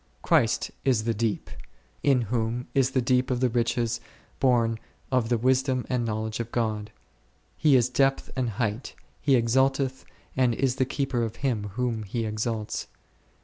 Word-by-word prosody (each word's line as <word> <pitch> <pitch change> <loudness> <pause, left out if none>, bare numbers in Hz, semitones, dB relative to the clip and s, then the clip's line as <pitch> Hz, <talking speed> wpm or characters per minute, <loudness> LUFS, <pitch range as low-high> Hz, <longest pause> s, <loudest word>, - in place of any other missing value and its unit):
Christ - - +2
is 125 -5 +2
the 115 0 0
deep, 110 -1 -2 0.5
in 135 -3 +3
whom 115 +2 -2
is 135 -2 +3
the 130 -2 0
depth 125 +1 +2
of 125 -2 0
the 125 0 +2
riches 120 0 0 0.4
both 115 -4 +2 0.3
of 125 -3 +1
the 120 - +3
wisdom 130 +1 +1
and 125 -2 +1
knowledge 110 0 -2
of 115 0 -4
God: 110 -3 -1 0.6
He 150 -3 +4
is 125 -2 +4
depth 135 +1 +1
and 130 -3 0
height; 115 0 -2 0.3
He 140 -2 +4
exalteth 130 +2 +2 0.3
and 125 -3 +2
is 130 +1 0
the 130 - +2
Keeper 135 -2 -1
of 115 -2 -2
him 115 -6 0
whom 120 -3 -1
He 110 +3 -3
exalts. 110 0 -3
120 Hz, 160 wpm, -26 LUFS, 115-130 Hz, 0.6 s, He